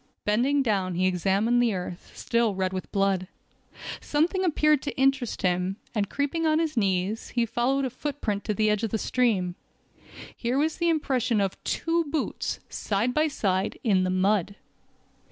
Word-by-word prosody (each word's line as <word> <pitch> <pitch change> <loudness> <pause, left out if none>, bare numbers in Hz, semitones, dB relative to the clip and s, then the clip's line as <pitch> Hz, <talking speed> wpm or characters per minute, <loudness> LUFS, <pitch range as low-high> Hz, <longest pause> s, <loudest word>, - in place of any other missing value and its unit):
Bending 260 +7 +2
down 195 -6 0
he 185 +2 +1
examined 195 +6 +2
the 230 -4 +2
earth, 180 -1 -6
still 235 -3 +1
red 190 0 -1
with 185 - -5
blood. 195 -2 +1 0.7
Something 340 +6 0
appeared 305 -4 +3
to 285 - -5
interest 270 -3 +1
him, 180 +1 +1 0.2
and 205 -3 -1
creeping 305 +3 -1
on 310 0 +3
his 320 -2 0
knees, 195 0 0
he 235 -1 +1
followed 250 +4 0
a 255 - -3
footprint 255 -7 -3
to 210 - -1
the 215 +1 +2
edge 210 -1 0
of 225 - -1
the 220 - -1
stream. 215 -7 +1 0.8
Here 245 +2 -1
was 315 +4 0
an 340 - +3
impression 260 -8 +1
of 195 -2 -2
two 335 0 0
boots, 300 0 -2
side 215 +5 -1
by 305 +3 +3
side, 190 -10 -1
in 195 -5 +3
the 185 - 0
mud. 190 +1 +1
225 Hz, 170 wpm, -26 LUFS, 195-275 Hz, 0.8 s, appeared